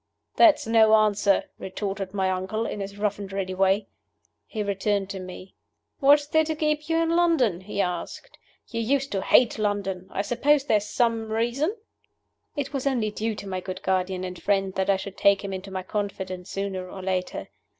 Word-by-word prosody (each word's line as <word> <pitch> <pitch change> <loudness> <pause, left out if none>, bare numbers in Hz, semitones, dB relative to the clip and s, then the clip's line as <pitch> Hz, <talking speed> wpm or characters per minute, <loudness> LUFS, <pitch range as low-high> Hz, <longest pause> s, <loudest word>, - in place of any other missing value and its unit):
"That's 330 -4 +6
no 220 -1 +5
answer," 210 -2 +3 0.2
retorted 195 0 -4
my 190 -1 0
uncle, 190 +5 -2
in 210 - -4
his 200 0 -6
rough 205 -1 -1
and 195 -1 -7
ready 195 -1 -3
way. 195 +2 +2 0.6
He 215 -2 -3
turned 200 0 -1
to 195 - -5
me. 185 +1 -9 0.5
"What 290 0 +6
is 290 - -11
there 315 +1 +3
to 315 0 -2
keep 305 0 -1
you 325 - +2
in 330 0 +2
London?" 310 - +3
he 200 +1 -2
asked. 180 - -5 0.3
"You 230 -1 -3
used 275 +4 0
to 195 - -1
hate 235 +1 +4
London. 195 -3 -1
I 200 - -2
suppose 275 +6 +2
there 245 -6 +3
is 205 0 -4
some 225 -1 0
reason?" 240 - 0 0.8
It 285 -1 -3
was 275 0 -1
only 235 -6 0
due 220 +1 -2
to 200 - -8
my 185 -1 -3
good 185 +1 -7
guardian 185 0 0
and 180 -1 -6
friend 195 -2 +1
that 190 +1 -1
I 195 - +4
should 195 0 -8
take 200 0 +4
him 195 -1 -4
into 190 +1 -6
my 190 -1 -4
confidence 190 -2 -4
sooner 190 -2 -4
or 190 0 -8
later. 185 -1 -2
200 Hz, 195 wpm, -25 LUFS, 190-235 Hz, 0.8 s, That's